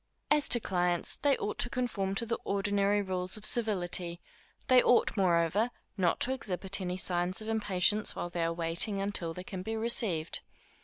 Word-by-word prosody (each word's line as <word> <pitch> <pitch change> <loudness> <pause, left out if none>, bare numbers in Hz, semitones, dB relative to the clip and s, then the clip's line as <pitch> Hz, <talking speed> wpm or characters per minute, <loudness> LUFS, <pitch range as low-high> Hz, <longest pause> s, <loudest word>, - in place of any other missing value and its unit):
As 300 -1 +5
to 240 - +8
clients, 180 -4 0
they 280 -2 +1
ought 210 - -4
to 245 - +1
conform 210 -6 -2
to 230 - -1
the 230 0 -3
ordinary 200 0 0
rules 185 +1 -1
of 215 - -7
civility; 180 -6 +2 0.5
they 255 -1 +6
ought, 245 - +2
moreover, 180 +3 +1 0.3
not 180 -4 0
to 260 - 0
exhibit 195 -5 -3
any 180 0 -3
signs 180 +1 -1
of 215 - -8
impatience 210 -1 +1
while 175 - -5
they 170 -1 -2
are 165 - 0
waiting 170 +4 0
until 195 -4 -2
they 180 - -7
can 185 0 -7
be 220 +4 -4
received. 220 -8 -2
195 Hz, 175 wpm, -30 LUFS, 180-220 Hz, 0.5 s, to